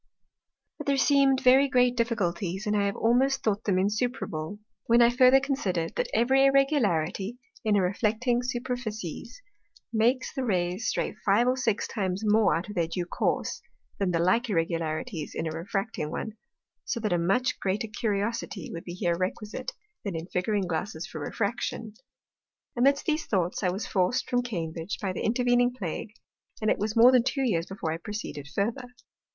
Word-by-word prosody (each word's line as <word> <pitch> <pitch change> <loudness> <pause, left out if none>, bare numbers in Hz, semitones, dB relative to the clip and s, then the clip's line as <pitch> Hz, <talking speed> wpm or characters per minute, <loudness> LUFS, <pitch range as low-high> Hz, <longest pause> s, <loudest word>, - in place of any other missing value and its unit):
But - - -7
there 280 -1 +2
seem'd 275 -1 +4
very 265 +2 +6
great 250 -1 +3
Difficulties, 200 -4 -1
and 210 0 +1
I 200 -1 +2
have 200 - -2
almost 260 +4 +2
thought 215 0 0
them 195 -3 +2
insuperable, 205 -4 -2 0.3
when 235 +1 +5
I 235 0 +6
further 255 +2 +6
consider'd, 205 - -2
that - - 0
every 260 +4 +3
Irregularity 240 - +2 0.3
in 215 -2 +2
a 195 - +3
reflecting 225 +6 +1
Superficies 245 - -5 0.5
makes 240 +4 +1
the 265 - -2
Rays 185 0 -1
stray - - -1
five 210 +5 +3
or 255 - +3
six 230 -5 0
times 190 -2 -2
more 210 -5 +4
out 170 +2 -3
of 210 - -7
their 170 -4 0
due 175 +1 -3
course, - - -1 0.4
than 195 -2 +1
the 175 - +1
like 185 +9 +2
Irregularities 165 0 -2
in - - -2
a 160 - -2
refracting 175 0 -3
one; 220 - -4 0.5
So 235 - -2
that 215 -4 0
a 175 - +2
much 195 +10 +1
greater 200 +4 -1
Curiosity 210 -3 -3
would 165 - -6
be 175 - -6
here 175 -3 0
requisite, 210 - -4 0.3
than 200 -4 -3
in 165 0 -4
Figuring 195 +3 -1
Glasses 170 0 -3
for 165 -4 -8
Refraction. 220 +4 -3 0.8
Amidst 275 +3 +3
these 310 0 0
Thoughts 185 -3 0
I 185 - +2
was 190 +4 -3
forc'd 195 +7 0
from 245 0 +1
Cambridge 170 -6 -4
by 195 -3 -2
the - - -4
Intervening 245 +1 +2
Plague, 200 +2 -5 0.5
and 215 - +1
it - - 0
was 215 +1 -2
more 235 +2 +8
than 255 -2 +5
two 265 +3 -1
Years 170 -6 0
before 190 -4 -4
I 160 - -2
proceeded 165 -7 -6
further. 225 - -2
210 Hz, 175 wpm, -27 LUFS, 180-245 Hz, 0.8 s, more